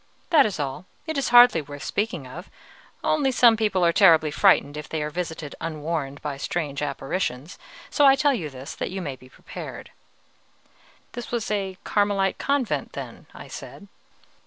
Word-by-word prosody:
That 295 -8 +6
is 200 - -5
all, 145 +6 -4 0.2
it 315 -1 -4
is 275 - 0
hardly 240 -7 +7
worth 145 0 -10
speaking 200 -9 -2
of, 155 +8 -10 0.5
only 290 -4 +2
some 240 -2 +6
people 210 -5 +1
are 170 - +3
terribly 165 -6 +5
frightened 150 -5 +3
if 150 0 -7
they 155 -2 -2
are 150 - -4
visited 160 -3 -5
unwarned 155 -3 -4
by 145 -2 -4
strange 145 -1 -3
apparitions; 145 +1 -3 0.3
so 290 - +2
I 270 - +7
tell 290 0 +2
you 170 - -3
this 135 0 -9
that - - -4
you 190 - -5
may 145 -7 -4
be 130 0 -18
prepared." - - -9 1.2
"This 240 -1 -7
was 235 -3 -3
a 195 -3 -2
Carmelite 200 -2 +1
convent, 275 -4 -1
then?" - - -8
I - - -10
said. 200 - -10
175 Hz, 170 wpm, -24 LUFS, 150-220 Hz, 1.2 s, hardly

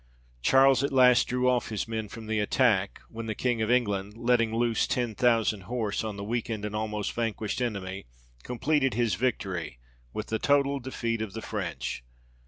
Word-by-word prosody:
Charles 135 - +5
at 140 - 0
last 125 -2 +5
drew 125 0 +1
off 125 -1 +2
his 110 -1 -3
men 110 -2 -3
from 115 +2 -9
the 110 0 -1
attack, 105 -2 +2
when 115 0 -7
the 110 - -2
King 120 -1 0
of 110 - 0
England, 105 -4 0
letting 115 -1 +2
loose 115 0 +1
ten 120 -3 -1
thousand 115 -4 +2
horse, 115 -5 -1
on 110 -2 -4
the 100 - -5
weakened, 115 -1 -2
and 105 0 -4
almost 105 -1 -2
vanquished 115 0 -2
enemy, 100 - -3 0.3
completed 135 - 0
his 120 -2 +1
victory, 95 - -2 0.3
with 105 - -5
the 110 - -1
total 140 -1 +2
defeat 115 -3 -3
of 110 -3 -4
the 110 - -5
French. 85 - -4
115 Hz, 180 wpm, -28 LUFS, 105-125 Hz, 0.3 s, Charles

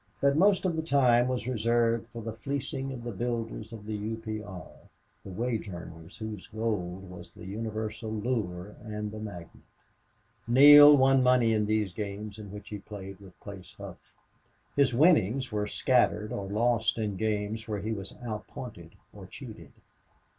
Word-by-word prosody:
But 140 0 +3
most 190 +3 +4
of 175 -3 +1
the 160 - 0
time 125 -6 +4
was 125 -2 -2
reserved 115 -1 +1
for 115 -1 -9
the 110 0 -4
fleecing 135 +3 -4
of 125 -3 -7
the 120 - -4
builders 115 0 -4
of 110 -3 -9
the 110 - -4
U. 105 +2 -3
P. 110 -1 -5
R., 95 -6 -9 0.6
the - - -9
wage 115 +2 -2
earners 85 -1 -10
whose 110 -3 -7
gold 95 -4 -3
was 90 -1 -11
the - - -12
universal 110 +2 -4
lure 105 -4 -3
and 105 -1 -5
the 110 - -7
magnet. 90 -6 -9 0.8
Neale 145 +4 +9
won 135 0 +5
money 125 -3 +4
in 105 -1 +1
those 105 -3 0
games 105 +1 -6
in 105 -2 -9
which 105 0 -9
he 105 - -6
played 95 -2 -9
with 95 -2 -15
Place 95 -3 -10
Hough. - - -11 0.6
His 140 -2 +4
winnings 135 - +4
he 105 -1 -1
scattered 115 -2 +1
or 100 -4 -4
lost 115 +1 +1
in 105 -3 -2
games 110 +2 -2
where 105 -2 -3
he 110 - -3
was 100 -3 -5
outpointed 105 -5 -7 0.2
or - - -11
cheated. - - -11
110 Hz, 170 wpm, -29 LUFS, 105-120 Hz, 0.8 s, Neale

